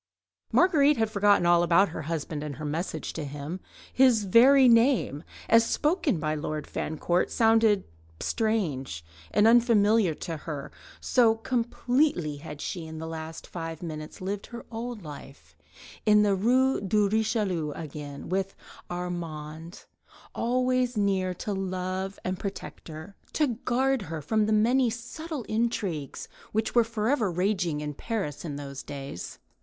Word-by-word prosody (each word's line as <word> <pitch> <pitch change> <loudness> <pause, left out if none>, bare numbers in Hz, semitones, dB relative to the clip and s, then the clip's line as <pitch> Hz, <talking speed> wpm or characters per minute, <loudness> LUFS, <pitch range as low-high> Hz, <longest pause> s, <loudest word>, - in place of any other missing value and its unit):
." - - -66
Marguerite 300 -5 +4
had 220 -1 0
forgotten 200 -3 +4
all 175 0 +5
about 175 +3 +4
her 160 - -6
husband 155 -1 -4
and 150 -2 -5
her 155 - -7
message 160 +5 -3
to 160 - -4
him; 145 +5 -6 0.3
his 250 -5 +5
very 255 +7 +6
name, 230 - +3 0.2
as 230 0 +6
spoken 300 - +1
by 155 -1 -1
Lord 155 0 -3
Fancourt, 175 +3 -1
sounded 225 -3 +4 0.4
strange 150 - -1 0.2
and 210 - +3
unfamiliar 225 -6 +4
to 165 +1 -5
her, 150 -2 -6 0.3
so 230 -3 +3
completely 240 - 0
had 150 0 -9
she 170 -4 -4
in 160 0 -8
the 160 - -5
last 160 0 -7
five 165 -1 -6
minutes 155 -1 -7
lived 195 +2 -4
her 235 0 -9
old 230 -2 -5
life 145 -2 -11 0.5
in 210 -1 +5
the 205 -1 +3
Rue 255 +7 +2
de 205 +1 +2
Richelieu 210 -7 0
again, 145 -2 -7
with 195 +2 -2 0.3
Armand 165 -2 -6 0.5
always 250 0 +1
near 195 -2 +1
her 185 - -2
to 205 +4 -4
love 190 0 -3
and 185 0 -3
protect 200 -1 -7
her, 160 +5 -9 0.2
to 305 - +3
guard 255 +1 0
her 165 -4 -5
from 210 +8 +1
the - - 0
many 240 +4 +3
subtle 265 +5 -6
intrigues 210 - -2 0.3
which 220 +1 0
were 240 - +5
forever 225 0 0
raging 180 -4 0
in 150 0 -4
Paris 195 - -4
in 150 -4 -5
those 140 -1 -7
days. 140 -9 -7
195 Hz, 150 wpm, -27 LUFS, 160-230 Hz, 0.5 s, very